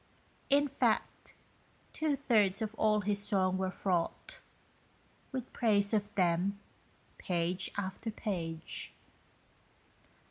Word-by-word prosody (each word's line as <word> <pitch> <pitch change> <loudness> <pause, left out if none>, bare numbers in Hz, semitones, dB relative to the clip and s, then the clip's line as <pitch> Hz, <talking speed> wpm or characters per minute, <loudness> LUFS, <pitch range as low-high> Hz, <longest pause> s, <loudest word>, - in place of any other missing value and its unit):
In 285 +1 +4
fact, 280 - -1 0.6
two 310 -2 +1
thirds 215 -7 +2
of 215 0 -3
all 215 -1 +2
his 205 0 0
song 190 -2 +1
was 190 0 -2
fraught 195 - -1 0.9
With 260 -1 -5
praise 205 -3 +2
of 205 -1 +1
them, 185 +2 +2 0.6
page 180 +1 -1
after 200 +3 -3
page. 170 -7 -4
200 Hz, 100 wpm, -33 LUFS, 185-225 Hz, 0.9 s, In